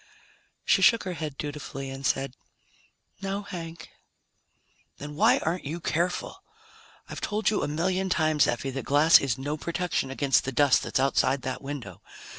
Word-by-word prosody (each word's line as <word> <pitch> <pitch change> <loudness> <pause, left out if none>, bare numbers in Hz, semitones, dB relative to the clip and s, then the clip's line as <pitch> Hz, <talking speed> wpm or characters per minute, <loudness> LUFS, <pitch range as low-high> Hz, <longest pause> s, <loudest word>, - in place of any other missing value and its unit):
_ - - -27 0.6
She - - +3
shook 230 - +5
her 185 - -4
head 155 -4 -5
dutifully 140 -2 -6
and 135 0 -8
said, 135 -1 0 0.9
"No, 195 +1 -3
Hank." 170 -4 -8 1.1
"Then 145 +1 -8
why - - +5
aren't 170 +3 -2
you 160 +5 -4
careful? 175 - -2 0.7
I've - - -7
told 215 +1 0
you 210 - 0
a - - -1
million 185 +5 -1
times, 155 -4 +3
Effie, 125 +3 -2
that 135 +1 -4
glass 150 +4 +6
is 135 -3 -1
no 145 +3 -3
protection 170 -4 -2
against 135 0 +2
the 135 - -3
dust 140 +1 +4
that's - - -1
outside 135 0 +2
that 130 - -4
window. 135 - -7
150 Hz, 165 wpm, -27 LUFS, 135-175 Hz, 1.1 s, glass